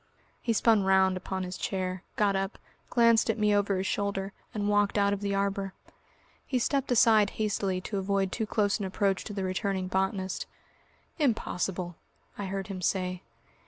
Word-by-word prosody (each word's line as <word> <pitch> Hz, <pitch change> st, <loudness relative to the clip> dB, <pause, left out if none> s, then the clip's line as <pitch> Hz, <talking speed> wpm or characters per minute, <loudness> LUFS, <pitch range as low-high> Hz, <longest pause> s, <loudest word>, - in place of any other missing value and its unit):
He 235 Hz, -, 0 dB
spun 225 Hz, -1 st, +4 dB
round 190 Hz, -1 st, +4 dB
upon 185 Hz, +1 st, -3 dB
his 180 Hz, 0 st, -6 dB
chair, 185 Hz, -1 st, -2 dB
got 205 Hz, -2 st, +2 dB
up, 195 Hz, +1 st, -2 dB, 0.3 s
glanced 230 Hz, -1 st, +4 dB
at 225 Hz, -, +1 dB
me 210 Hz, -1 st, +3 dB
over 200 Hz, -1 st, +2 dB
his 190 Hz, -, -2 dB
shoulder, 195 Hz, 0 st, -2 dB, 0.2 s
and 205 Hz, -1 st, -2 dB
walked 205 Hz, 0 st, +2 dB
out 200 Hz, 0 st, +3 dB
of 200 Hz, -, -3 dB
the 200 Hz, -1 st, -1 dB
arbour. 195 Hz, -1 st, -1 dB, 0.7 s
He 260 Hz, -, 0 dB
stepped 275 Hz, +2 st, 0 dB
aside 220 Hz, -3 st, +5 dB
hastily 200 Hz, -3 st, 0 dB
to 200 Hz, +2 st, -3 dB
avoid 195 Hz, 0 st, 0 dB
too 220 Hz, -2 st, -2 dB
close 205 Hz, -1 st, +1 dB
an 200 Hz, -, -2 dB
approach 195 Hz, 0 st, 0 dB
to 210 Hz, -, -6 dB
the 195 Hz, -1 st, -3 dB
returning 185 Hz, 0 st, -1 dB
botanist. 190 Hz, 0 st, -1 dB, 0.7 s
"Impossible," 185 Hz, -, -1 dB, 0.4 s
I 205 Hz, -, -4 dB
heard 195 Hz, 0 st, -3 dB
him 195 Hz, -3 st, -6 dB
say. 185 Hz, 0 st, -1 dB
195 Hz, 170 wpm, -29 LUFS, 190-210 Hz, 0.7 s, aside